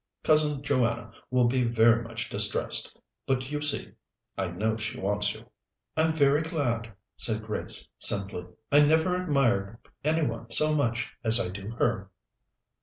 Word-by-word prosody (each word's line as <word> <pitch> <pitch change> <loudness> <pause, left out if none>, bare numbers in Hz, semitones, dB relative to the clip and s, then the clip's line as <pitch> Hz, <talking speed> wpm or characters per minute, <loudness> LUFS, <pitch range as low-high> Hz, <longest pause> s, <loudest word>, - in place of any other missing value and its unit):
Cousin 150 -2 +3
Joanna 120 -5 0 0.2
will 125 -1 +3
be 125 +1 +1
very 115 0 +4
much 115 - -6
distressed; - - +1 0.3
but, 130 0 -1
you 150 0 -3
see, 145 -1 0 0.4
I 95 - -2
know 105 +6 -1
she 110 +1 -5
wants 100 +2 0
you." - - -13 0.5
"I'm 160 0 +2
very 145 -1 +3
glad," 125 -9 -2 0.3
said 110 -1 -1
Grace 110 -1 -2
simply. 100 -3 0 0.2
"I 145 - +6
never 160 +4 +3
admired 120 - 0 0.3
any 155 +1 +1
one 115 -2 -5
so 155 +6 +5
much 120 -6 -1
as 115 0 +5
I 90 - -1
do 100 +2 -7
her." 105 -5 0
120 Hz, 150 wpm, -27 LUFS, 110-145 Hz, 0.5 s, I